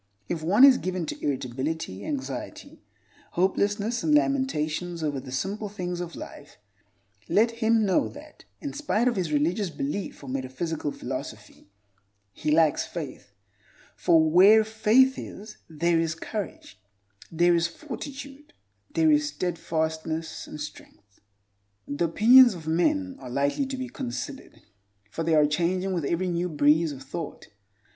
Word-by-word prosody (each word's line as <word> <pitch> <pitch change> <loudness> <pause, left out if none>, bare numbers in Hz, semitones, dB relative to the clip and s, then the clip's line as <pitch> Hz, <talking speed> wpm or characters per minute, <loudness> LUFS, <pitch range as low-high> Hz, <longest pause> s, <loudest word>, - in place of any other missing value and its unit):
If 165 - -3
one 195 +10 +4
is 270 -2 +8
given 185 -2 -3
to - - -7
irritability, 130 -5 -3
anxiety, 135 -2 -6 0.5
hopelessness, 205 +5 0
and 300 - +3
lamentations 175 - 0
over 145 -3 -1
the 130 0 -10
simple 200 +10 -3
things 180 -3 -4
of 170 -1 -6
life, 145 - -10 0.7
let 230 +3 +3
him 225 -1 +2
know 190 - +2
that, - - -13 0.2
in 285 -2 -5
spite 270 -6 0
of 245 - +1
his 180 -5 -2
religious 170 +7 +1
belief 145 +4 -4
or - - -9
metaphysical 135 +4 -3
philosophy, - - -7 0.6
he - - -3
lacks 155 -1 +3
faith. 150 -10 -7 0.6
For 165 -2 +4
where 195 +7 +7
faith 220 +5 +3
is 210 +2 -9
there 165 +1 +1
is 165 -1 -1
courage, 290 - -7 0.5
there 175 +1 +3
is 170 0 +2
fortitude, 280 - -9 0.4
there 160 -1 +4
is 150 0 +3
steadfastness 160 0 -3
and 150 - -8
strength. 105 -8 -11 0.7
The 145 +4 -1
opinions 235 +7 +7
of 165 -3 -10
men 270 - 0
are - - -9
lightly 140 - 0
to 265 0 -5
be 255 0 -4
considered, 260 +2 -7 0.5
for 165 - -4
they 165 0 +2
are 150 -1 +5
changing 180 +5 0
with 170 -5 -1
every 170 +5 0
new 175 +1 -1
breeze 150 +1 +3
of 135 -2 -9
thought. 145 +3 -7
170 Hz, 140 wpm, -26 LUFS, 150-220 Hz, 0.7 s, is